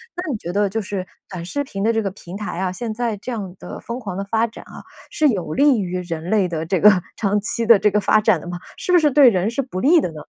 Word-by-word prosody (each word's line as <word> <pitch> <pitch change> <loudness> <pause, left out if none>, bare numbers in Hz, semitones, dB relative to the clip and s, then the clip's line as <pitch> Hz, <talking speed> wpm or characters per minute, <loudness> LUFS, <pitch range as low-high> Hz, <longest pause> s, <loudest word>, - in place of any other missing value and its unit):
那 350 -4 -4
你 230 - -2
觉 175 -2 -6
得 205 -1 +1
就 225 +3 -2
是 190 -1 -4 0.2
短 180 -3 -7
视 285 +11 -3
频 195 -7 -5
的 225 - +3
这 225 -1 0
个 195 - -2
平 190 -1 -10
台 210 -4 -5
啊， 185 -1 -1
现 225 +3 -4
在 230 -2 -2
这 250 +5 -7
样 195 -5 -5
的 - - -8
疯 235 +2 -5
狂 195 -6 -6
的 195 - -3
发 225 +3 0
展 230 - -12
啊， - - -12 0.3
是 305 - +2
有 180 - -1
利 280 -5 +4
于 180 -1 -3
人 165 -2 -5
类 205 -4 +2
的 165 -2 -4
这 180 +1 0
个 210 - +8 0.3
长 205 -1 +1
期 230 +2 -1
的 230 -2 +7
这 210 +1 +2
个 210 - +2
发 215 +1 +3
展 - - +3
的 - - -10
吗？ 175 0 -5 0.2
是 360 - -2
不 - - +8
是 300 -4 +3
对 275 -2 +7
人 190 0 0
是 255 +4 -1
不 240 -8 -6
利 325 +5 +5
的 180 - -1
呢？ 155 - -9
210 Hz, 315 characters per minute, -21 LUFS, 185-235 Hz, 0.3 s, 个